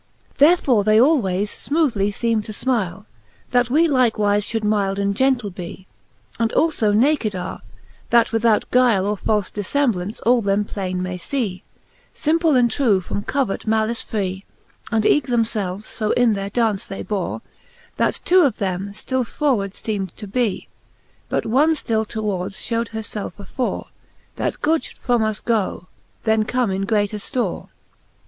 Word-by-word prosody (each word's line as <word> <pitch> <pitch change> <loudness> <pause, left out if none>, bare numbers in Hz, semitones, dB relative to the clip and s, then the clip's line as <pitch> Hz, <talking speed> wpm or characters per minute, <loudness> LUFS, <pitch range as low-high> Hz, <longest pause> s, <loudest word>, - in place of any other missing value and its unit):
Therefore 280 - +5
they 215 +1 +4
alwaies 210 - +3 0.2
fmoothly 275 -10 +2
feeme 225 +1 0
to - - -6
fmile, 210 -5 -2 0.5
That 245 -1 +2
we 315 +6 +4
Hkewife 255 -6 +3 0.3
fliould 225 +2 -2
mylde 205 -2 +1
and 200 0 0
gentle 250 -4 +1
be, 180 0 -8 0.5
And 230 -1 +2
alfo 305 -10 +2
naked 230 -1 +2
are, 180 0 -5 0.5
that 235 -1 +4
without 225 -1 +2
guile 240 -6 +4
Or 205 +1 0
falfe 210 0 -1
diflemblaunce 210 -3 -1
all 240 +1 +4
them 200 0 +1
plainc 190 -3 -4
may 180 0 -3
fee, 200 -5 -3 0.5
Simple 320 -1 +2
and 240 -2 +4
true, 230 -9 +3
from 185 +2 -4
covert 255 -2 -2
malice 220 +1 +1
free: 190 -3 -3 0.5
And 220 -2 +1
eeke 295 -4 +3
them 240 -2 +2
felves 205 -3 -3
fo 215 -1 -1
in 245 -2 +3
their 195 -1 -3
daunce 215 -2 0
they 195 - -6
bore, 200 -4 -3 0.5
That - - 0
two 370 +1 +6
of 280 -7 +2
them 195 -1 -3
ftill 260 +4 -2
forward 235 -7 -1
feem'd 200 -5 -4
to 215 - -7
bee, 215 0 -1 0.3
' - - -37
But - - -1
one 295 +8 +3
ftill 220 -6 -1
towards 200 -4 -3
fhew'd 230 0 -2
her 220 -1 -5
felte 210 -1 -6
afore; 245 +5 -3 0.5
That - - -3
good 315 0 +3
fhould - - -10
from 245 -2 +1
us 215 -1 -2
goe, 205 -5 -1 0.3
then 220 -1 +2
come 245 -3 0
in 195 +1 -2
greater 210 -1 +1
ftore. 245 +4 -3
220 Hz, 160 wpm, -21 LUFS, 200-245 Hz, 0.5 s, two